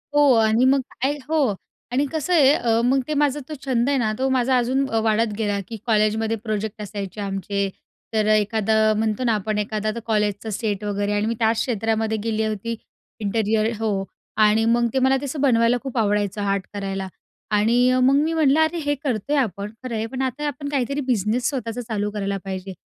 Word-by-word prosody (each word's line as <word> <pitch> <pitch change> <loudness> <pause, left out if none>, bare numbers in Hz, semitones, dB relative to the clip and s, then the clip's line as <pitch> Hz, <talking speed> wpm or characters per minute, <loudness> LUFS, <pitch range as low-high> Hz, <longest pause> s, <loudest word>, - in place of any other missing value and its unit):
हो 290 -2 +6
आणि 225 +2 +3
मग 270 +1 +4 0.2
काय 280 +3 +1
हो 290 -9 +2 0.4
आणि 270 +4 +1
कसं 315 +2 -1
आहे? 285 -5 +6
अ, 230 -3 +1
मग 265 +2 +3
ते 305 - -1
माझा 290 -1 +1
तो - - -4
छंद 250 -1 +1
आहे 280 - +2
ना? 220 -4 +1
तो 265 +1 +1
माझा 260 0 +2
अजून 260 +3 +1
अ, 225 - +1
वाढत 220 0 +1
गेला 205 -2 0
की 225 - -6
कॉलेजमध्ये 220 0 +1
प्रोजेक्ट 215 -1 -3
असायचे 205 -1 -6
आमचे, 195 0 -2 0.4
तर 215 -1 +1
अ, - - +6
एखादा 215 +1 +2
म्हणतो 220 +2 0
ना 235 -2 +2
आपण, 210 +1 -2
एखादा 215 +1 -2
आता 235 +2 -3
कॉलेजचा 210 -1 0
सेट 210 -1 -2
वगैरे 205 0 -1
आणि 205 +1 0
मी 230 +1 -1
त्याच 225 0 +2
क्षेत्रामध्ये 220 -2 0
गेली 220 -1 0
होती, 220 +2 -3 0.4
इंटरिअर 215 +1 +1
हो 205 -3 0 0.4
आणि 220 +2 +3
मग 235 +1 +3
ते 265 - +2
मला 265 +1 +3
ते - - -4
असं 280 +1 -4
बनवायला 240 -3 +3
खूप 265 -2 -5
आवडायचं, 205 -2 0
आर्ट 200 -1 0
करायला 195 -1 -3 0.4
आणि 230 +4 +3
अ, 255 - +2
मग 265 +2 +4
मी 325 +1 0
म्हटलं, 310 -2 +3
"अरे! 315 +2 +2
हे 290 - +2
करतोय 265 +1 -1
आपण, 205 -4 -1
खरं 250 -2 -4
आहे, 220 0 -1
पण 260 +3 -5
आता 280 +3 -2
आपण 285 0 -4
काहीतरी 280 0 -1
बिझनेस 230 0 +1
स्वतःचा 245 -3 -4
चालू 210 -1 -1
करायला 200 -1 -2
पाहिजे, 190 0 -5
225 Hz, 200 wpm, -22 LUFS, 210-260 Hz, 0.4 s, हो